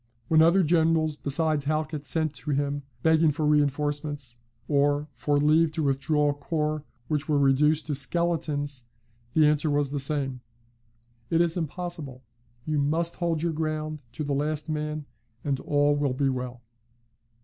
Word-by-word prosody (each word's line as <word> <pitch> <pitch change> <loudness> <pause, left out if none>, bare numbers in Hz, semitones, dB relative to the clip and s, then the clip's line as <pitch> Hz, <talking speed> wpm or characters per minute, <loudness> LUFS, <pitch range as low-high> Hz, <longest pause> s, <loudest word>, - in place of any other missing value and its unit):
When 160 -1 +5
other 170 +4 +5
generals 160 -1 +2
besides 150 0 0
Halkett 155 0 -2
sent 155 +1 +1
to 130 +2 -7
him, 145 0 0 0.2
begging 160 0 +4
for 150 +1 -1
reinforcements, 145 -2 0 0.3
or 145 +1 +2
for 145 +4 0
leave 155 +2 +4
to 160 -1 -1
withdraw 145 +2 +1
corps 150 +1 -2 0.2
which 150 0 -2
were 150 - +3
reduced 145 +3 +3
to 150 - -2
skeletons, 145 -3 -1 0.5
the 155 - +5
answer 150 +1 +2
was 145 -1 +1
the 145 - -1
same: 135 -2 -1 0.9
"It 165 - +2
is 170 -1 +2
impossible; 160 -5 -5 0.4
you 155 -1 0
must 165 +4 0
hold 170 -3 -1
your 170 -1 0
ground 155 -2 -3
to 135 - -4
the 145 -1 -1
last 150 +2 -1
man, 150 0 -3 0.4
and 140 -2 -1
all 145 +1 +2
will 145 -3 0
be 135 +1 +1
well." 125 -2 -4
150 Hz, 150 wpm, -26 LUFS, 140-155 Hz, 0.9 s, When